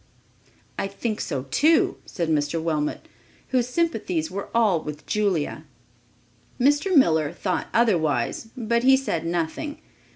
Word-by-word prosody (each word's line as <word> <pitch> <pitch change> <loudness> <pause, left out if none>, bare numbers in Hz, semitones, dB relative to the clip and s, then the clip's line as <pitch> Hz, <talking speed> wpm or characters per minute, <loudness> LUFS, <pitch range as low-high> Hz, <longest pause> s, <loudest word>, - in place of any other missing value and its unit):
"I - - -1
think 210 +2 -3
so 135 -5 -3
too," 315 +2 +3
said 170 -3 -3
Mr. 150 +1 0
Wilmot, 155 -2 -2 0.4
whose 250 -2 +1
sympathies 225 - -1
were 200 +1 -5
all 215 -8 +3
with 150 0 -7
Julia. 180 -7 -1 0.9
Mr. 290 +8 +3
Miller 160 - +4
thought 185 -2 -2
otherwise, 190 -4 +1
but 235 0 +1
he 265 +2 +6
said 170 -11 -2
nothing. 175 - -3
195 Hz, 125 wpm, -24 LUFS, 160-245 Hz, 0.9 s, he